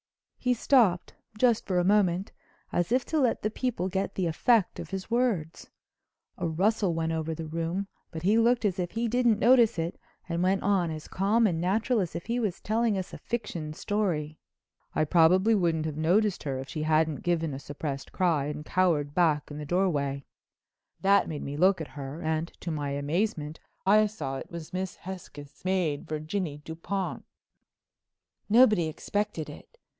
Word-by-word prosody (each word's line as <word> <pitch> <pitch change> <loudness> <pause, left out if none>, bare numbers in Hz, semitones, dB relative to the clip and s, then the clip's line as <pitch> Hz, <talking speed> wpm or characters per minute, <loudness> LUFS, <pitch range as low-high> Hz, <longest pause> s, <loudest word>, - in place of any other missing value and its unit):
He 250 -1 +1
stopped—just 225 0 +2
for 185 -2 0
a 175 - +3
moment—as 185 -1 0
if 250 +1 +2
to 315 - 0
let 255 -5 +1
the 215 - 0
people 230 -6 -2
get 190 +1 -2
the 185 - 0
effect 195 +5 +2
of - - -7
his 195 +3 -6
words. 225 -10 0 0.7
A - - 0
rustle 190 +2 +1
went 165 0 -1
over 160 0 -2
the 165 0 -5
room, 165 +5 -3 0.2
but 160 -1 -7
he 210 +5 +4
looked 235 0 +3
as 190 -2 0
if 175 -1 -1
he 230 +2 0
didn't 240 -1 +3
notice 240 -4 +5
it 165 +1 -3 0.3
and 170 0 -2
went 190 +2 +2
on 195 -4 +2
as 155 -1 -6
calm 210 +5 +2
and 170 -5 +1
natural 215 +6 +1
as 180 -5 -2
if 170 - -5
he 235 +1 -1
was 210 -7 -2
telling 220 -1 +1
us 190 0 -5
a - - -7
fiction 175 -10 -4
story. 160 -6 -2 0.6
"I - - +3
probably 180 +7 +4
wouldn't 165 -6 +1
have 155 -2 -4
noticed 185 +5 +2
her 135 -3 -3
if 135 +1 -6
she 155 - -5
hadn't 155 -1 +2
given 165 -4 0
a 135 - -5
suppressed 140 -1 -5
cry 165 -6 +1
and 150 +1 -5
cowered 155 -6 +1
back 155 -4 +2
in 145 - -6
the 150 - -5
doorway. 145 -6 0 0.8
That 200 +1 +4
made 150 -3 -4
me 140 - -5
look 185 +3 +4
at 160 - -6
her 140 +1 -7
and, 160 +1 -1
to 170 - -3
my 145 -2 -2
amazement, 150 +2 -2 0.3
I 210 +2 +5
saw 145 -10 -5
it - - -8
was 170 +1 -8
Miss 185 0 -3
Hesketh's 170 -6 -10
maid, 180 -6 0
Virginie 155 +1 -3
Dupont." 180 +4 -4 1.3
Nobody 215 -7 +5
expected 205 +1 -3
it. - - -13
175 Hz, 175 wpm, -28 LUFS, 155-210 Hz, 1.3 s, notice